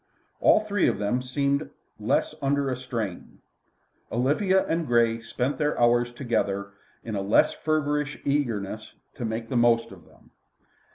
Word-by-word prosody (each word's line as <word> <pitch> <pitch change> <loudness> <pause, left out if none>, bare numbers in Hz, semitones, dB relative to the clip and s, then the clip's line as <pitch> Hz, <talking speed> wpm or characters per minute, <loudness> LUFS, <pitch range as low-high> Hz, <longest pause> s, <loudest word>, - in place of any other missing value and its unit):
All - - +5
three 205 -2 +1
of - - +1
them 105 +5 0
seemed 140 +3 -1 0.3
less - - 0
under 140 0 +1
a - - -1
strain. 115 -7 -5 0.7
Olivia 170 - +2
and 165 0 -1
Grey 115 -1 +3
spent 125 +5 -3
their 150 -1 0
hours 120 0 +3
together 100 -6 -2 0.3
in 115 - -5
a 100 - -1
less 100 +2 +3
feverish 150 -1 -1
eagerness 110 -7 -2 0.2
to 120 - -5
make 115 +1 -3
the 125 - 0
most 120 -1 +3
of - - -14
them. - - -23
125 Hz, 150 wpm, -26 LUFS, 115-145 Hz, 0.7 s, All